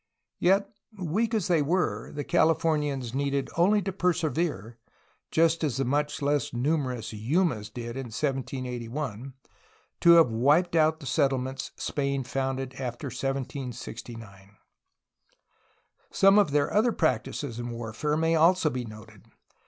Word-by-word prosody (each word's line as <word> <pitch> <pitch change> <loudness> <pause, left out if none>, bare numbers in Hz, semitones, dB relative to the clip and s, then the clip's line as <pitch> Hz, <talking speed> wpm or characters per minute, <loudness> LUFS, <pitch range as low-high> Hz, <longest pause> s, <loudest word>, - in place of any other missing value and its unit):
Yet, 195 +3 +3 0.3
weak 205 +6 -1
as 210 -6 0
they 170 -4 +3
were, 145 - -1
the 145 - -4
Californians 150 -7 +1
needed 140 0 -1
only 200 +4 +3
to 195 - -2
persevere, 155 - -1 0.5
just 165 0 +2
as 140 -5 0
the 135 - 0
much 145 +3 -1
less 145 0 0
numerous 125 -4 -1
Yumas 115 - 0
did 120 +1 -7
in 135 0 -4
1781, 130 -1 -4 0.6
to 170 - +6
have 165 -8 +6
wiped 145 +10 +3
out 160 0 +3
the - - -9
settlements 130 0 0
Spain 140 -1 -2
founded 130 0 -3
after 125 +1 -4
1769. 120 -6 -6 1.5
Some 195 +1 +5
of 205 - +3
their 145 0 +1
other 220 +4 +3
practices 125 -3 -1
in 120 0 -4
war 115 -2 -6
fare 150 +6 -1
may 165 +1 +2
also 165 0 +4
be 125 -1 -4
noted. 110 -1 -13
140 Hz, 130 wpm, -27 LUFS, 120-160 Hz, 1.5 s, to